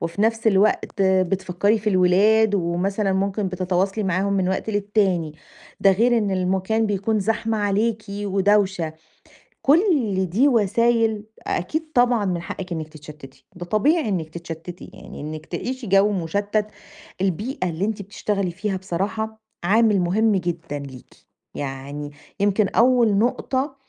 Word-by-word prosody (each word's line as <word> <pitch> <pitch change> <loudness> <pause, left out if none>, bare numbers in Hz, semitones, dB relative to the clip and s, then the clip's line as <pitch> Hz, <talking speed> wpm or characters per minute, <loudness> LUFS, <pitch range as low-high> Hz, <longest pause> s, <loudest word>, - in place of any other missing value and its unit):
وفي 165 +4 -2
نفس 225 +1 +1
الوقت 200 -1 +2
بتفكّري 190 +2 +1
في 215 +1 -1
الولاد، 205 +4 +4
ومثلًا 190 +3 0
ممكن 195 +1 -1
بتتواصلي 185 +3 -1
معاهم 190 +2 0
من 190 -2 +1
وقت 190 +3 -2
للتاني، 200 -6 0 0.5
ده 195 - +6
غير 235 +4 +3
إن 205 -2 -1
المكان 190 +4 0
بيكون 205 +2 0
زحمة 225 +2 -1
عليكِ 210 +2 0
ودوشة، 200 -3 +1 0.7
كُلّ 275 - +3
دي 230 +11 +3
وسايل 230 -2 +2 0.2
أكيد 315 - -2
طبعًا 245 -3 +3
من 180 -3 -1
حقِّك 185 +1 -7
إنِّك 160 -2 -3
تتشتِّتي، 150 -3 -13
ده 175 - -7
طبيعي 230 - +2
إنِّك 170 -5 -2
تتشتِّتي، 170 +2 -8
يعني - - -11
إنِّك 155 +1 -6
تعيشي 255 -2 -5
جو 195 +2 +4
مشتَّت 205 +4 -1 0.5
البيئة 195 - -1
اللي 170 +4 -2
أنتِ 215 -1 -3
بتشتغلي 200 -1 -2
فيها 195 +2 -3
بصراحة 195 +4 -3 0.2
عامل 210 +2 +3
مهم 205 +5 +2
جدًا 170 -5 -3
ليكِ. 135 -3 -11 0.4
يعني 140 +1 -5 0.3
يمكن 200 +1 +2
أول 235 -1 +3
نقطة 260 +4 0
195 Hz, 135 wpm, -22 LUFS, 180-220 Hz, 0.7 s, ده